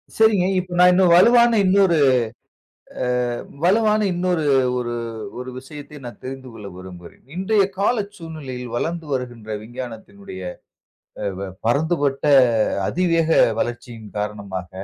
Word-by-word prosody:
சரிங்க. 215 -5 +4
இப்ப 180 -1 -6
நான் 180 0 +7
இன்னும் 180 -2 +4
வலுவான 235 +3 +5
இன்னொரு 190 -3 +4 1.1
அ - - 0 0.6
வலுவான 215 +3 +3
இன்னொரு 175 -2 0 0.3
ஒரு 120 -1 -3 0.5
ஒரு 125 0 -6
விஷயத்தை 145 +2 -10
நான் 120 - -9
தெரிந்து 130 0 -7
கொள்ள 105 -3 -10
விரும்புகிறேன். 90 -2 -12
இன்றைய 195 +2 +2
கால 210 +5 +2 0.2
சூழ்நிலையில் 135 -8 -7
வளர்ந்து 165 +5 -3
வருகின்ற 120 -4 -5
விஞ்ஞானத்தினுடைய 110 -6 -9 0.8
அ - - -2
வ 100 -1 -5 0.2
பரந்துபட்ட 145 +1 0 0.6
அதிவேக 165 -2 +1 0.3
வளர்ச்சியின் 120 -2 -5
காரணமாக 100 -3 -5
145 Hz, 115 wpm, -21 LUFS, 120-180 Hz, 1.1 s, நான்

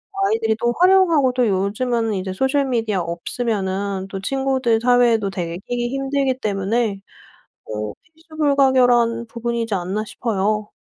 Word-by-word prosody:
아이들이 390 - +1
또 240 0 +1
활용하고 355 -7 +4
또 250 -2 +2
요즘에는 215 +4 0
이제 190 -1 -3
소셜 265 +7 +1
미디어 225 -6 0
없으면은 190 +2 -2
또 195 - -5
친구들 265 -1 0
사회에도 240 -3 +3
되게 170 -3 -4
끼기 240 0 -2
힘들기 270 0 -1
때문에 205 0 -1 0.7
어 105 -1 -5 0.2
'필수불가결한 265 -7 +2
부분이지 235 -1 -3
않나.' 190 +4 -2
싶어요. 210 -1 -2
235 Hz, 325 characters per minute, -20 LUFS, 200-260 Hz, 0.7 s, 활용하고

